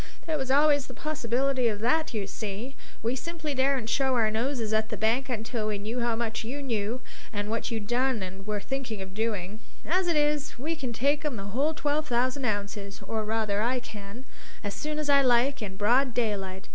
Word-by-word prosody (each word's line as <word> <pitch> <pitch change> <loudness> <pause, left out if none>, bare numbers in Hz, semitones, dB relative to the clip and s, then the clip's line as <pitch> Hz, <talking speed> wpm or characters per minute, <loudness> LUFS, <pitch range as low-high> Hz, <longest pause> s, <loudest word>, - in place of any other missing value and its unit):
There 320 - 0
was 265 -3 -2
always 285 0 +5
the - - -9
possibility 270 -4 +1
of 210 -2 0
that, 315 +7 +2
you 215 -4 -1
see; 215 +6 -5 0.3
we 235 +3 +1
simply 315 +1 -3
daren't 265 -3 +2
show 265 +1 +2
our 220 -3 +3
noses 230 -1 0
at 220 0 +2
the 215 - -3
bank 230 +7 +2
until 225 -2 -2
we 210 -1 0
knew 220 +5 -3
how 235 -1 +1
much 225 0 -2
you 275 +6 -4
knew, 230 -1 -1 0.3
and 205 -1 -2
what 230 - -1
you'd 225 -3 -2
done 245 -1 +1
or 190 +1 -6
were 210 +1 -2
thinking 240 -4 -3
of 190 0 -10
doing. 210 -2 -2 0.3
As 365 +3 +2
it 340 - +2
is, 295 -2 +1
we 310 +6 -1
can 265 -6 -3
take 285 +6 +1
'em 295 -4 -1
the 200 -1 -6
whole 295 +6 +2
twelve 300 +1 0
thousand 255 +2 +1
ounces, 200 -2 -2
or 220 +1 -1
rather 215 -1 0
I 250 +3 +2
can, 215 +1 -9 0.4
as 205 -1 -2
soon 300 +9 -3
as 305 -1 -1
I 280 -1 +6
like, 255 +1 +4
in 190 -2 -5
broad 240 +4 +3
daylight. 195 -5 -1
235 Hz, 210 wpm, -28 LUFS, 215-275 Hz, 0.4 s, I